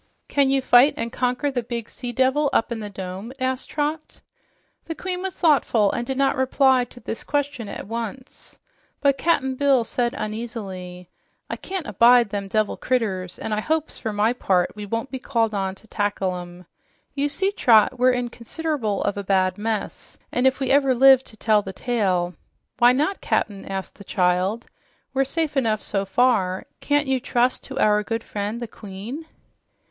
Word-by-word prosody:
"Can 280 Hz, -2 st, +2 dB
you 270 Hz, -1 st, +2 dB
fight 255 Hz, +3 st, +6 dB
and 230 Hz, 0 st, -3 dB
conquer 250 Hz, +3 st, 0 dB
the 250 Hz, -2 st, -1 dB
big 235 Hz, -1 st, -5 dB
sea 245 Hz, -2 st, -6 dB
devil 265 Hz, +4 st, +2 dB
up 225 Hz, -, +2 dB
in 235 Hz, -, -3 dB
the 210 Hz, -1 st, -6 dB
dome?" 190 Hz, +3 st, -7 dB
asked 260 Hz, 0 st, -2 dB
Trot. 305 Hz, +1 st, -3 dB, 0.7 s
The 325 Hz, -, -5 dB
queen 360 Hz, +2 st, -4 dB
was 380 Hz, -1 st, -4 dB
thoughtful, 240 Hz, -, +3 dB
and 240 Hz, -, -3 dB
did 265 Hz, -, -2 dB
not 275 Hz, 0 st, +2 dB
reply 260 Hz, -1 st, +3 dB
to 245 Hz, -, -14 dB
this 225 Hz, -1 st, -5 dB
question 285 Hz, -6 st, -2 dB
at -, -, -6 dB
once. 230 Hz, +4 st, -7 dB, 0.4 s
But 280 Hz, -2 st, +2 dB
Cap'n 275 Hz, -6 st, +1 dB
Bill 270 Hz, -2 st, +3 dB
said 240 Hz, +1 st, -1 dB
uneasily, 195 Hz, -5 st, -6 dB, 0.4 s
"I -, -, -1 dB
can't 375 Hz, -4 st, -5 dB
abide 235 Hz, +2 st, +5 dB
them 200 Hz, -1 st, -3 dB
devil 215 Hz, +1 st, 0 dB
critters, 195 Hz, -8 st, -1 dB
an' 220 Hz, -, -4 dB
I 210 Hz, -, 0 dB
hopes, 315 Hz, +6 st, -2 dB
for 220 Hz, -, -3 dB
my 210 Hz, +3 st, +2 dB
part, 185 Hz, -7 st, +1 dB
we 210 Hz, -1 st, -7 dB
won't 230 Hz, +5 st, -3 dB
be 260 Hz, -, -4 dB
called 230 Hz, -4 st, 0 dB
on 195 Hz, -1 st, -2 dB
to 220 Hz, -, -20 dB
tackle 205 Hz, -3 st, -1 dB
'em. 175 Hz, 0 st, -9 dB, 0.5 s
You 285 Hz, +1 st, 0 dB
see, 385 Hz, +7 st, 0 dB
Trot, 245 Hz, -, +4 dB
we're 255 Hz, +1 st, +5 dB
in 245 Hz, -1 st, 0 dB
consider'ble 245 Hz, -4 st, -3 dB
of 205 Hz, -, -1 dB
a 200 Hz, -, -3 dB
bad 185 Hz, -1 st, +1 dB
mess, 220 Hz, 0 st, -4 dB
an' 250 Hz, +2 st, +2 dB
if 265 Hz, +1 st, +1 dB
we 265 Hz, -2 st, 0 dB
ever 275 Hz, -2 st, +4 dB
live 265 Hz, +1 st, +7 dB
to 220 Hz, -, -13 dB
tell 215 Hz, -1 st, +3 dB
the 195 Hz, -1 st, -7 dB
tale 185 Hz, -6 st, 0 dB, 0.2 s
" -, -, -52 dB
"Why 240 Hz, +1 st, +7 dB
not, 305 Hz, +10 st, 0 dB
Cap'n?" 200 Hz, -2 st, -1 dB
asked 195 Hz, +1 st, -5 dB
the -, -, -9 dB
child. 185 Hz, +5 st, 0 dB, 0.5 s
"We're 270 Hz, 0 st, +2 dB
safe 310 Hz, +1 st, -2 dB
enough 225 Hz, -5 st, +1 dB
so 195 Hz, -1 st, -1 dB
far. 190 Hz, -3 st, +1 dB
Can't 290 Hz, 0 st, +1 dB
you 265 Hz, -1 st, +1 dB
trust 250 Hz, +2 st, 0 dB
our 210 Hz, -5 st, +3 dB
good 225 Hz, +2 st, -3 dB
friend, 210 Hz, +3 st, -4 dB
the 240 Hz, -, -5 dB
queen?" 220 Hz, +10 st, -8 dB
235 Hz, 185 wpm, -23 LUFS, 205-270 Hz, 0.7 s, live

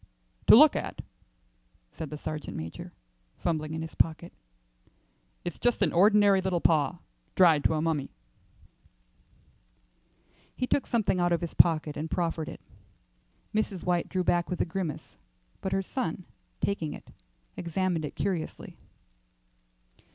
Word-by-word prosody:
"To -, -, +10 dB
look -, -, +8 dB
at," -, -, -4 dB, 0.9 s
said 155 Hz, -, -7 dB
the 150 Hz, -, -6 dB
sergeant 155 Hz, 0 st, -5 dB
major, 80 Hz, +1 st, -7 dB, 0.5 s
fumbling 155 Hz, -2 st, -2 dB
in 160 Hz, -, -4 dB
his 160 Hz, -, -8 dB
pocket, 165 Hz, +1 st, 0 dB, 1.1 s
"it's 175 Hz, -, -5 dB
just 245 Hz, -1 st, +2 dB
an -, -, +1 dB
ordinary 205 Hz, +1 st, +5 dB
little 185 Hz, -2 st, 0 dB
paw, 165 Hz, +1 st, +2 dB, 0.4 s
dried 165 Hz, -5 st, +5 dB
to 160 Hz, -, +3 dB
a 155 Hz, -, -1 dB
mummy." 155 Hz, -4 st, -1 dB, 2.5 s
He 255 Hz, -, -1 dB
took 275 Hz, -, 0 dB
something 215 Hz, -6 st, +1 dB
out 175 Hz, 0 st, +2 dB
of 170 Hz, -, +1 dB
his 170 Hz, -, -4 dB
pocket 155 Hz, -3 st, +4 dB
and 155 Hz, +2 st, -4 dB
proffered 165 Hz, -2 st, -2 dB
it. -, -, -10 dB, 0.9 s
Mrs. 210 Hz, -4 st, -1 dB
White 175 Hz, -1 st, 0 dB
drew 185 Hz, -1 st, -1 dB
back 175 Hz, 0 st, +1 dB
with 180 Hz, -, -3 dB
a -, -, +2 dB
grimace, 175 Hz, -3 st, -5 dB, 0.4 s
but 190 Hz, -, -3 dB
her 195 Hz, 0 st, 0 dB
son, 185 Hz, -6 st, -4 dB, 0.4 s
taking 165 Hz, -7 st, -1 dB
it, -, -, -12 dB, 0.5 s
examined 175 Hz, -1 st, -1 dB
it 150 Hz, -, -5 dB
curiously. 180 Hz, -5 st, -4 dB
170 Hz, 135 wpm, -28 LUFS, 160-190 Hz, 2.5 s, To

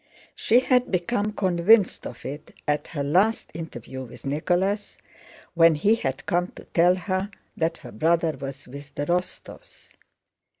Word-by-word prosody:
She 240 Hz, +3 st, +3 dB
had 250 Hz, -1 st, +2 dB
become 205 Hz, +4 st, 0 dB
convinced 190 Hz, +1 st, +3 dB
of 120 Hz, -, -11 dB
it 145 Hz, +3 st, -8 dB
at 150 Hz, 0 st, 0 dB
her 145 Hz, -3 st, -4 dB
last 190 Hz, +10 st, +2 dB
interview 130 Hz, -5 st, -7 dB
with 125 Hz, 0 st, -12 dB
Nicholas, 180 Hz, +8 st, -1 dB, 0.6 s
when 165 Hz, -1 st, +5 dB
he 200 Hz, +9 st, +3 dB
had 135 Hz, -, -3 dB
come 175 Hz, 0 st, +1 dB
to -, -, -11 dB
tell 175 Hz, +2 st, +5 dB
her 185 Hz, +1 st, -2 dB, 0.3 s
that 165 Hz, 0 st, -1 dB
her -, -, -11 dB
brother 165 Hz, 0 st, +2 dB
was 135 Hz, 0 st, -8 dB
with 140 Hz, +2 st, -11 dB
the 145 Hz, -, -2 dB
Rostóvs. 180 Hz, +3 st, -5 dB
170 Hz, 145 wpm, -25 LUFS, 145-190 Hz, 0.6 s, when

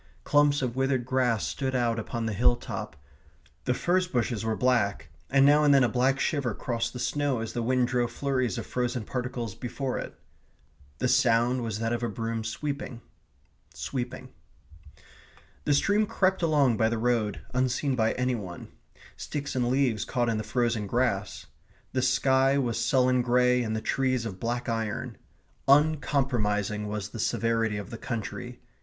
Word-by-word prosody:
Clumps 145 Hz, -1 st, +3 dB
of 125 Hz, -2 st, -2 dB
withered 130 Hz, -2 st, 0 dB
grass 125 Hz, -4 st, +1 dB
stood 130 Hz, -1 st, -2 dB
out 120 Hz, -2 st, +1 dB
upon 115 Hz, +1 st, -4 dB
the 110 Hz, -, -1 dB
hill 120 Hz, +4 st, +4 dB
top; 120 Hz, -, -6 dB, 0.7 s
the 125 Hz, -, +2 dB
furze 180 Hz, +4 st, +1 dB
bushes 120 Hz, -, -1 dB
were 110 Hz, -1 st, 0 dB
black, 105 Hz, -10 st, +1 dB, 0.2 s
and 135 Hz, 0 st, +5 dB
now 145 Hz, +1 st, +6 dB
and 145 Hz, -1 st, +6 dB
then 135 Hz, -, +5 dB
a -, -, +4 dB
black 130 Hz, +3 st, +1 dB
shiver 135 Hz, -9 st, 0 dB
crossed 115 Hz, -1 st, -2 dB
the -, -, -6 dB
snow 145 Hz, 0 st, 0 dB
as 115 Hz, 0 st, -4 dB
the 120 Hz, -, -2 dB
wind 125 Hz, +1 st, +2 dB
drove 120 Hz, -2 st, 0 dB
flurries 130 Hz, -1 st, -1 dB
of 115 Hz, -, -4 dB
frozen 125 Hz, -1 st, -2 dB
particles 125 Hz, -3 st, -4 dB
before 130 Hz, +3 st, -4 dB
it. -, -, -7 dB, 0.8 s
The 125 Hz, -, 0 dB
sound 125 Hz, -1 st, +3 dB
was 110 Hz, -3 st, -3 dB
that 115 Hz, +1 st, -1 dB
of 120 Hz, -, -2 dB
a 120 Hz, -, -1 dB
broom 115 Hz, +2 st, -3 dB
sweeping 140 Hz, +2 st, -4 dB, 0.7 s
sweeping. 125 Hz, -2 st, -5 dB, 1.4 s
The 145 Hz, -, +3 dB
stream 205 Hz, +8 st, +2 dB
crept 190 Hz, -1 st, +1 dB
along 145 Hz, -8 st, +3 dB
by 110 Hz, +1 st, +3 dB
the 115 Hz, -, -1 dB
road 110 Hz, -3 st, 0 dB
unseen 130 Hz, +2 st, +1 dB
by 110 Hz, -2 st, +2 dB
any 125 Hz, 0 st, 0 dB
one. 95 Hz, -7 st, -6 dB, 0.5 s
Sticks 140 Hz, -2 st, -5 dB
and 125 Hz, -2 st, +1 dB
leaves 125 Hz, -5 st, +1 dB
caught 120 Hz, -1 st, 0 dB
in 110 Hz, -2 st, 0 dB
the -, -, -3 dB
frozen 115 Hz, -4 st, 0 dB
grass. 105 Hz, -6 st, -1 dB, 0.5 s
The 130 Hz, -, +1 dB
sky 130 Hz, +1 st, +3 dB
was 120 Hz, -4 st, 0 dB
sullen 130 Hz, -1 st, +3 dB
grey 125 Hz, 0 st, +3 dB
and 110 Hz, -2 st, -2 dB
the 110 Hz, -, -2 dB
trees 130 Hz, -2 st, 0 dB
of 95 Hz, -4 st, -6 dB
black 120 Hz, +3 st, -2 dB
iron. 115 Hz, -3 st, -3 dB, 0.5 s
Uncompromising 130 Hz, -8 st, +2 dB
was 105 Hz, -1 st, -4 dB
the 115 Hz, -, -8 dB
severity 115 Hz, -1 st, 0 dB
of 105 Hz, +4 st, -7 dB
the 115 Hz, -, -7 dB
country. 115 Hz, -4 st, -5 dB
125 Hz, 170 wpm, -27 LUFS, 115-130 Hz, 1.4 s, now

